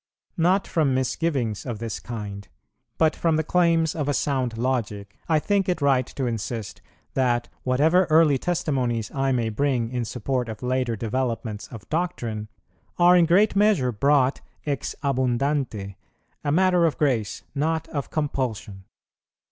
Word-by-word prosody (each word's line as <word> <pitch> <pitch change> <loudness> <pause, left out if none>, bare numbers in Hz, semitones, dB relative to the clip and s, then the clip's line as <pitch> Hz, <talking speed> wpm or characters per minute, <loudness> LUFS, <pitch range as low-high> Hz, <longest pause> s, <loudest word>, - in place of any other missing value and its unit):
Not 185 +4 +3
from 150 -6 +1
misgivings 130 -4 -1
of 120 -4 -4
this 115 0 -4
kind, 100 -4 -7 0.5
but 160 -1 +3
from 165 -2 +1
the 160 - +1
claims 165 -1 +2
of 145 -3 -2
a 145 - +1
sound 130 -5 -1
logic, 110 -5 -2
I 160 - +4
think 195 +4 +1
it 180 - 0
right 135 -3 +2
to 135 - -4
insist, 115 -2 -4 0.3
that, 120 -2 +1
whatever 155 +8 +3
early 155 -4 +4
testimonies 130 -10 -1
I 135 -1 0
may 120 -3 0
bring 120 0 0
in 125 -1 -1
support 125 +1 -2
of 110 +2 -7
later 125 -2 0
developments 115 -1 -3
of 115 -4 -11
doctrine, 120 -11 -2 0.5
are 175 +1 +6
in 175 -2 +5
great 200 +6 +4
measure 195 -11 +3
brought 135 +3 +2 0.2
ex 140 -5 -2
abundante, 130 -6 -1 0.5
a 145 - 0
matter 180 +1 +4
of 155 - -2
grace, 115 -8 0
not 160 +3 -1
of 140 -4 -4
compulsion. 120 -10 -3
130 Hz, 150 wpm, -24 LUFS, 115-160 Hz, 0.5 s, are